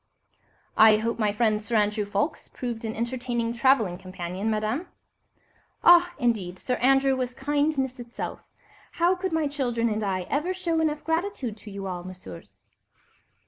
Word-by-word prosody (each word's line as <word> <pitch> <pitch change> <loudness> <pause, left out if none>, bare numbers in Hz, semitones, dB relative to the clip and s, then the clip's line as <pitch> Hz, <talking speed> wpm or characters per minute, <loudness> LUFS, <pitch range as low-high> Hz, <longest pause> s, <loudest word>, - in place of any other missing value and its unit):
"I 220 -1 +8
hope 230 +2 -2
my 210 -2 +2
friend, 215 0 +1
Sir 230 +2 -3
Andrew 210 0 +2
Ffoulkes, 205 +9 -2
proved 235 -3 -5
an 220 - -3
entertaining 235 0 -2
travelling 230 -7 +2
companion, 185 +2 -4
Madame?" 220 +10 -1 1.0
"Ah, 350 0 +7
indeed, 205 -7 0
Sir 250 +5 -2
Andrew 270 +1 +4
was 250 -1 -3
kindness 285 -2 0
itself. 240 0 -6 0.5
How 345 +1 +3
could 375 0 -3
my 320 -1 +1
children 245 -5 -1
and 215 0 -1
I 190 -2 -1
ever 300 - -1
show 335 -3 0
enough 300 -2 0
gratitude 325 - -2
to 210 +1 -11
you 195 -1 -6
all, 180 -2 -4
Messieurs?" 180 - -11
235 Hz, 150 wpm, -26 LUFS, 210-285 Hz, 1.0 s, I